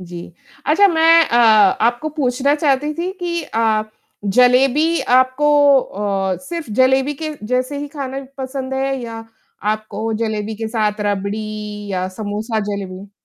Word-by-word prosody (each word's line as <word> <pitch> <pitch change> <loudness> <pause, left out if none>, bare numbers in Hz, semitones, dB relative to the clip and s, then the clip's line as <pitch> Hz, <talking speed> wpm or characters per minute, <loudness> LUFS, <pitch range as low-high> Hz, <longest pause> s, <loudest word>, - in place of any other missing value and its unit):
जी, 175 -1 -9 0.3
अच्छा 370 +7 +5
मैं 330 0 +5
अ, 235 - +1
आपको 230 +4 +4
पूछना 280 -2 0
चाहती 295 -1 +1
थी 350 +3 -3
कि 340 -1 -2
अ, 225 -5 0 0.4
जलेबी 255 +9 +3
आपको 255 +4 +2 0.3
अ, 195 -3 -2
सिर्फ़ 335 -6 -6
जलेबी 265 +2 +3
के 310 -1 -3
जैसे 255 +4 -1
ही 290 0 -5
खाना 275 -2 -6
पसंद 265 0 -4
है 270 0 -1
या 225 -1 -7 0.5
आपको 215 +1 -3
जलेबी 220 -1 -3
के 225 +1 -4
साथ 215 -2 -1
रबड़ी 205 0 -2 0.5
या 185 0 -1
समोसा 215 +3 -3
जलेबी? 195 -1 -6
250 Hz, 135 wpm, -18 LUFS, 210-285 Hz, 0.5 s, अच्छा